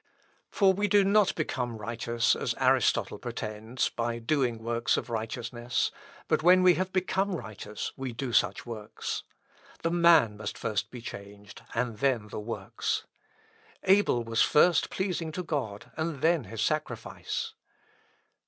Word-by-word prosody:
For 195 -2 +4
we 205 +2 0
do 205 0 +5
not 200 0 +3
become 125 -7 -2
righteous, 115 +2 0
as - - -2
Aristotle - - +2
pretends, 110 +3 -3
by 115 0 -2
doing 120 0 0
works 115 0 0
of 120 - -4
righteousness; 120 +1 -2 0.4
but - - +2
when 180 +2 +6
we 180 -1 +7
have 185 +2 -2
become 190 +1 0
righteous 105 - -6
we 135 -2 -4
do 120 +1 -4
such - - +2
works. 110 -3 -5 0.6
The 165 - +1
man 170 -11 +5
must 105 -1 -5
first 105 0 -2
be 125 -1 -9
changed, 100 -2 -10
and 115 -2 -1
then 120 -6 +1
the - - -5
works. 105 -3 -3 0.8
Abel 190 -11 +4
was 115 0 0
first 170 +2 +4
pleasing 180 -4 -2
to 180 - -3
God, 120 - -4
and 160 -4 -3
then 165 -5 +3
his 110 +2 -3
sacrifice." 140 -7 -3
120 Hz, 145 wpm, -29 LUFS, 110-170 Hz, 0.8 s, we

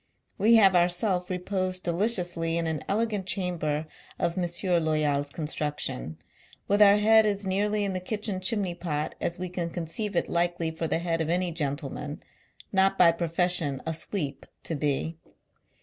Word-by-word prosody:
We 220 +4 +5
have 195 -4 +6
ourself 180 +1 +2
i 185 - -1
eposed 185 0 -1
j 175 - +2
deliciously, 175 -4 +1
in 170 - 0
an 160 -3 -2
elegant 210 -2 -1
chamber 170 -6 -1 0.3
of 170 - -1
M. 175 -2 -1 0.3
Loyal's 150 -2 +1
construction, 150 - -3 0.5
with 205 +1 +2
our 205 0 +8
head 220 +1 +5
as 200 -1 -1
nearly 205 +2 0
in 195 -1 -1
the 185 - -2
kitchen 205 +1 -3
chimney 190 -1 -1
pot 155 -3 -3
as 170 - -1
we 180 +1 -3
can 175 -1 -3
conceive 175 +5 -4
it - - +1
likely 170 -1 0
for 160 0 -3
the - - +1
head 165 -1 -1
of 160 - -2
any 180 +1 +1
gentleman, 145 -1 -4 0.5
not 195 0 +3
by 170 -2 +7
profession 170 -3 0
a 160 - -1
Sweep, 155 -3 -4 0.2
to - - -3
be. 150 +2 -2
175 Hz, 165 wpm, -27 LUFS, 160-195 Hz, 0.5 s, our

